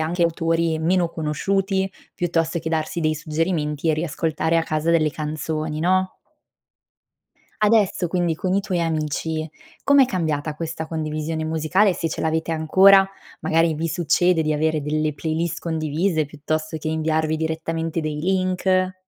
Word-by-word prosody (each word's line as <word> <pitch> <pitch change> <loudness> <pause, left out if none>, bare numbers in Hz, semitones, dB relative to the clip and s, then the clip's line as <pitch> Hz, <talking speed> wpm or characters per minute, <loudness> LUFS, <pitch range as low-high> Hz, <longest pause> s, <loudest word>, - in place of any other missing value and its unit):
anche 170 +3 0
ad 170 - +5
autori 165 0 0
meno 175 +1 +2
conosciuti, 190 +5 -1 0.2
piuttosto 170 -1 0
che 160 - -4
darsi 160 +1 -2
dei 155 -1 +1
suggerimenti 155 -1 -1
e - - +2
riascoltare 160 +1 -1
a 165 - +3
casa 155 +1 -1
delle 155 -2 +3
canzoni, 155 0 -3
no? 185 +2 +1 1.5
Adesso 205 -5 +3
quindi 175 -2 0
con 185 +2 -1
i 200 - +1
tuoi 180 -4 -1
amici, 155 0 -2 0.4
com'è 280 -2 +6
cambiata 155 - -2
questa 160 0 -5
condivisione 155 0 -3
musicale, 160 +6 +2
e - - -1
se 165 - -2
ce - - -4
l'avete 160 +1 0
ancora, 190 +5 +6 0.3
magari 165 0 +2
vi 165 +2 -2
succede 170 +1 +2
di 155 -1 +1
avere 155 0 +1
delle 155 +1 -1
playlist 160 +2 -2
condivise, 160 +1 0
piuttosto 155 +2 -3
che 155 - -4
inviarvi 160 0 0
direttamente 160 +1 -2
dei 155 -1 -3
link? 185 +1 +1
160 Hz, 150 wpm, -22 LUFS, 155-175 Hz, 1.5 s, com'è